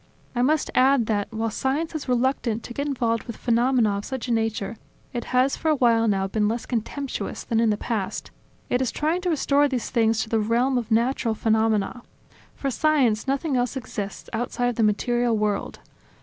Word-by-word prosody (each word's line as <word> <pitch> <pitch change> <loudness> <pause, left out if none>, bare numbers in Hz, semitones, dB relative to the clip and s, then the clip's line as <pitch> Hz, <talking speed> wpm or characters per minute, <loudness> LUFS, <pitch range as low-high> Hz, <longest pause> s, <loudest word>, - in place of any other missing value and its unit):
I 240 - +1
must 300 +4 +2
add 260 -2 +4
that, 210 -1 -1
while 225 0 -2
science 285 +9 -1
is 305 -4 -5
reluctant 245 -2 0
to 240 - -7
get 285 +3 -2
involved 235 -5 0
with 235 - -7
phenomena 235 -3 +2
of - - -7
such 260 0 -5
a - - -2
nature, 225 -2 -1 0.4
it 240 -2 -3
has 255 +2 +2
for 320 - -1
a 310 - +4
while 230 -4 +3
now 195 -2 +1
been 210 +2 0
less 230 +2 -2
contemptuous 260 +3 -3
than 225 - 0
in 230 -1 +3
the 210 - +1
past: 220 -4 -3 0.4
it 250 - +1
is 255 - 0
trying 320 +4 0
to 360 - -1
restore 290 -2 +3
these 255 -4 -3
things 225 -2 +2
to 220 - -9
the 225 - +2
realm 235 +5 +1
of 235 -2 -6
natural 230 0 +1
phenomena. 220 +1 +1 0.5
For 275 - -2
science, 265 -5 +2
nothing 275 +1 0
else 250 +2 0
exists 210 -6 -6
outside 245 +1 -1
of 245 - -3
the - - +2
material 235 +2 +2
world. 210 -1 -1
240 Hz, 195 wpm, -24 LUFS, 220-265 Hz, 0.5 s, add